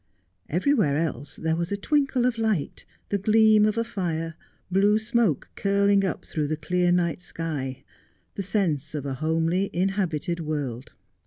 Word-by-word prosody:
Everywhere 185 - +2
else 150 -4 -3
there 160 0 -1
was 170 +2 -3
a 200 - 0
twinkle 275 0 +1
of 245 -2 0
light, 215 -10 -1 0.2
the 200 - 0
gleam 215 +1 +5
of 215 - -1
a 230 - +2
fire, 165 -7 -3 0.4
blue 200 +3 +4
smoke 220 - 0
curling 200 0 +3
up 190 - -2
through 150 -2 -2
the 155 +1 -2
clear 175 +3 +1
night 175 -1 +1
sky, 140 -7 -5 0.5
the - - -4
sense 160 -7 -1
of 145 -2 -4
a 135 - -2
homely 165 +6 0
inhabited 180 -2 -1
world. 145 -6 -4
180 Hz, 155 wpm, -25 LUFS, 155-205 Hz, 0.5 s, gleam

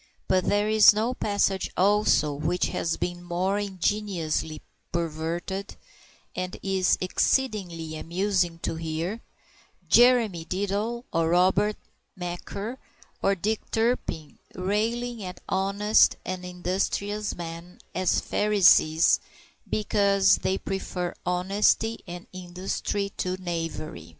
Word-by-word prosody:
But 185 -1 +2
there 205 +1 +2
is 215 -1 +7
no 225 +4 0
passage, 200 -4 0
also, 195 -6 +3
which 155 +5 -1
has 165 - -1
been 175 0 -3
more 180 +3 -1
ingeniously 185 -6 -2 0.3
perverted, 170 +4 -3 0.6
and 185 0 -3
it - - -15
is 190 -1 +2
exceedingly 185 -6 0
amusing 175 +1 0
to 160 - -2
hear 165 +7 -3 0.7
Jeremy 235 -8 +5
Diddler 205 +6 -2
or 165 -1 +2
Robert 185 +4 +3 0.4
Macaire 200 +7 -5 0.4
or 195 - +2
Dick 210 +4 -2
Turpin 220 -9 -1 0.2
railing 225 +4 -1
at 180 -1 -7
honest 200 +3 +3
and 185 -1 -4
industrious 195 +3 -2
men 170 +1 -8 0.2
as 185 0 +1
Pharisees 190 -6 +4 0.5
because 200 -2 +3
they 190 - 0
prefer 180 -2 -4
honesty 200 +5 +2
and 175 0 -7
industry 185 +2 -3
to 185 0 -2
knavery. 165 - -5
185 Hz, 105 wpm, -26 LUFS, 175-205 Hz, 0.7 s, is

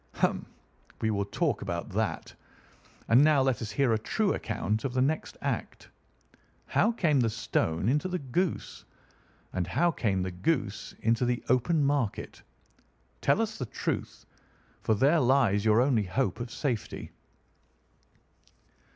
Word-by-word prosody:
"Hum! - - 0 0.5
We 110 - 0
will 100 -1 0
talk - - -1
about - - -4
that. - - -2 0.8
And 120 +5 +7
now 150 -3 +5
let 130 -4 0
us 110 - -4
hear 120 +2 +2
a 110 - +1
true 205 - 0
account 110 0 -2
of 130 -2 -3
the 130 - +3
next 155 +3 -2
act. - - -4 0.8
How 225 - +2
came 160 - +2
the 115 -2 +2
stone 95 -5 -1
into 150 +8 +2
the 180 0 -2
goose, 165 +5 -2 0.7
and 90 -2 -1
how 170 - +2
came 100 - 0
the 95 - -3
goose 105 - -2
into 115 +2 +2
the 120 0 0
open 135 +6 +3
market? 140 -6 -1 0.8
Tell 225 - +3
us 215 -1 -5
the 125 - -3
truth, - - -4 0.6
for 110 - +2
there 145 +9 +4
lies 125 -6 +3
your 110 +1 +5
only 125 -6 +2
hope 90 +1 -1
of 120 0 -4
safety." 120 -3 -3
125 Hz, 145 wpm, -29 LUFS, 110-145 Hz, 0.8 s, And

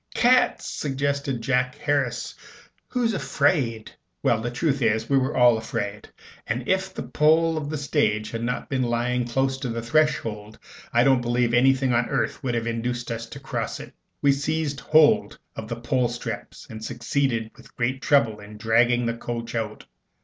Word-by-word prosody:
"Cats!" 250 +2 +3
suggested 140 -3 -2
Jack 125 +1 +1
Harris. 140 -5 -1 0.5
"Who's 240 -3 0
afraid?" 115 - 0 0.3
Well, 110 -1 +2
the 120 - -2
truth 135 +2 -1
is, 110 -1 +1
we - - +5
were 130 +2 -1
all 120 -2 +5
afraid; 105 -2 -4 0.4
and 120 +3 -2
if 190 0 +1
the - - -6
pole 160 +2 +3
of 150 -2 -3
the 155 - -2
stage 125 -7 0
had 115 - -4
not 125 +1 -2
been 135 -3 -1
lying 120 0 0
close 135 +2 0
to 130 - -3
the 115 0 -3
threshold, 115 -7 0 0.3
I 120 - +4
don't 135 -1 +4
believe 120 0 +1
anything 130 +1 +3
on 120 +1 +1
earth - - -1
would 125 -2 -1
have 115 0 -1
induced 120 +1 -3
us 115 0 -4
to 140 - -9
cross 135 - -4
it. - - -10 0.3
We 140 - +6
seized 145 +1 -1
hold 155 -1 +4 0.2
of 110 - -6
the 115 -1 -4
pole 125 0 +1
straps 120 0 -6
and 110 -1 -9
succeeded 120 -1 -1
with - - -18
great 130 +3 -1
trouble 115 -8 +3
in 105 +1 -11
dragging 120 +2 +3
the 115 - 0
coach 115 0 -5
out. 110 -2 -4
125 Hz, 175 wpm, -24 LUFS, 115-140 Hz, 0.5 s, We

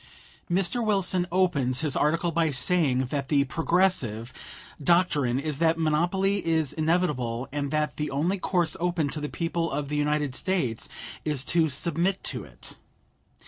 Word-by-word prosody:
Mr. 195 +7 +1
Wilson 190 -4 +1
opens 145 -9 +1
his 150 -3 -1
article 165 +3 +1
by 165 0 +1
saying 135 -2 +1
that 140 -2 -2
the 140 -1 +3
Progressive 140 - 0 0.5
"doctrine 145 -7 +2
is 150 -1 -3
that 165 0 +3
monopoly 175 +5 +1
is 160 -4 +1
inevitable, 150 -8 0
and 145 -1 -2
that 150 0 -1
the 150 0 -2
only 170 +8 0
course 175 -2 0
open 170 -4 0
to 150 - -5
the 150 - -3
people 165 0 -2
of 140 0 -3
the 150 - -1
United 150 -2 0
States 135 -9 -1 0.3
is 145 -4 0
to 165 -2 +2
submit 170 +7 +1
to - - -3
it." - - -11
155 Hz, 150 wpm, -26 LUFS, 140-175 Hz, 0.5 s, the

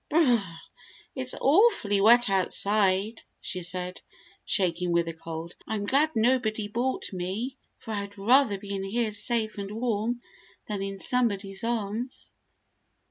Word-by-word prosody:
"B - - -4
r 335 - +6
r 260 - +4
r, 175 -7 -5 0.5
it's 260 -2 -2
awfully 285 - +4
wet 240 +3 +6
outside," 200 +2 +2 0.2
she 185 - -3
said, 180 +1 -3 0.4
shaking 180 -2 0
with 170 0 +2
the 165 - -4
cold. 165 +1 -7
"I'm 210 -2 -2
glad 280 +8 +3
nobody 220 -2 +1
bought 240 +1 -2
me, 195 +9 -3 0.2
for 225 - -9
I'd 205 -1 -4
rather 230 +1 +4
be 200 0 -7
in 195 -1 -3
here 220 +3 -1
safe 220 0 0
and 200 -1 -5
warm 230 +1 -2 0.4
than 205 -2 -4
in 195 0 -4
somebody's 200 -4 0
arms." 230 +2 -3
210 Hz, 145 wpm, -27 LUFS, 195-240 Hz, 0.5 s, r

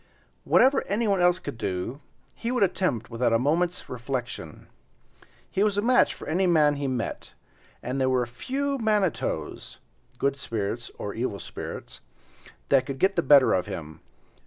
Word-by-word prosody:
Whatever 270 +2 +4
anyone 200 -2 +1
else 175 0 +4
could 120 - -7
do, 100 +7 -3 0.3
he 230 - -4
would 245 -4 +2
attempt 175 - 0
without 115 0 +1
a - - +5
moment's 170 +8 0
reflection. 125 - -5 0.9
He 195 - 0
was 205 -1 +2
a - - +3
match 250 +2 +4
for - - -10
any 185 +4 +1
man 150 -4 +4
he 140 -1 -2
met, 125 -3 -4 0.5
and 130 +2 -2
there 130 - +3
were 125 -1 +2
few 270 - -3
manitoes* 210 -6 -1 0.4
(*good 140 0 0
spirits 115 -1 -3
or 100 - -5
evil 115 -3 -2
spirits) - - -8 0.7
that 135 -2 +4
could 135 -1 -4
get 190 +6 +2
the 170 - +3
better 145 -4 +6
of 90 - 0
him. 80 -3 -7
140 Hz, 160 wpm, -26 LUFS, 120-190 Hz, 0.9 s, better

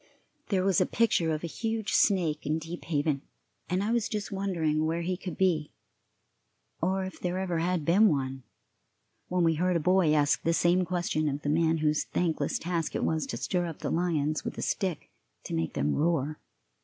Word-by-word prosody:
There 190 -3 +2
was 195 -2 +3
a - - +2
picture 180 -8 +2
of 155 +1 -2
a 170 - -6
huge 225 -2 -1
snake 170 -7 +2
in 155 +2 0
Deep 165 +2 -7
Haven, 145 -3 0 0.5
and 185 +3 0
I 215 - 0
was 235 -2 +1
just 210 -1 -3
wondering 170 -6 0
where 165 +1 -1
he 185 +2 -1
could 180 -3 -7
be, 165 -6 +1 1.1
or 190 +2 +1
if 190 - -8
there 180 0 -2
ever 180 -3 -1
had 170 -2 0
been 195 +7 +5
one, 135 -3 -2 0.9
when 180 -1 +1
we 165 -1 +4
heard 180 +3 +1
a - - +3
boy 180 0 +3
ask 145 -1 +2
the 165 - +1
same 175 +2 +3
question 175 -4 0
of 140 +1 -4
the 145 - -1
man 160 +1 +2
whose 150 0 +2
thankless 160 -5 -1
task 170 -2 -2
it - - -1
was 160 -1 0
to - - -4
stir 175 -2 -1
up 165 - -6
the - - -3
lions 155 -3 0
with - - -5
a - - -3
stick 185 -5 -2 0.3
to - - -6
make 80 0 -1
them 75 +1 0
roar. 155 -2 0
170 Hz, 200 wpm, -29 LUFS, 155-185 Hz, 1.1 s, been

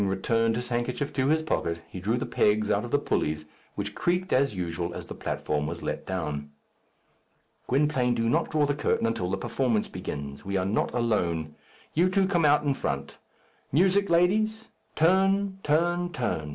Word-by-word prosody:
Having 100 - +1
returned 115 +4 +1
his 120 +1 -4
handkerchief 125 +4 -2
to 130 -1 +1
his 160 +2 +2
pocket, 85 - -1
he 95 - -8
drew 110 +6 0
the 125 - -2
pegs 105 -3 +2
out 105 +1 +1
of 120 - -5
the 145 - +3
pulleys, 75 - -1 0.3
which - - -4
creaked 180 +2 0
as 135 -3 +2
usual 85 -1 -3
as - - -5
the - - -7
platform 75 0 -2
was 85 +1 -5
let - - -4
down. 75 -6 -3 1.2
"Gwynplaine, 130 -3 +2
do 115 0 0
not 160 +8 +1
draw 150 -1 +2
the 145 - +1
curtain 145 -4 0
until 115 -6 -1
the 95 - -1
performance 115 +2 0
begins. 70 0 -6
We 100 0 -1
are 90 - 0
not 100 +3 0
alone. 85 -10 0 0.4
You 175 +4 +3
two 190 0 +2
come 175 -4 +2
on 150 +1 +4
in 140 - +3
front. 70 - -4 0.5
Music, 190 +6 +3
ladies! 215 +6 +2 0.3
turn, 195 +3 +3
turn, 175 +3 +1
turn. 80 - -2
120 Hz, 180 wpm, -27 LUFS, -, 1.2 s, on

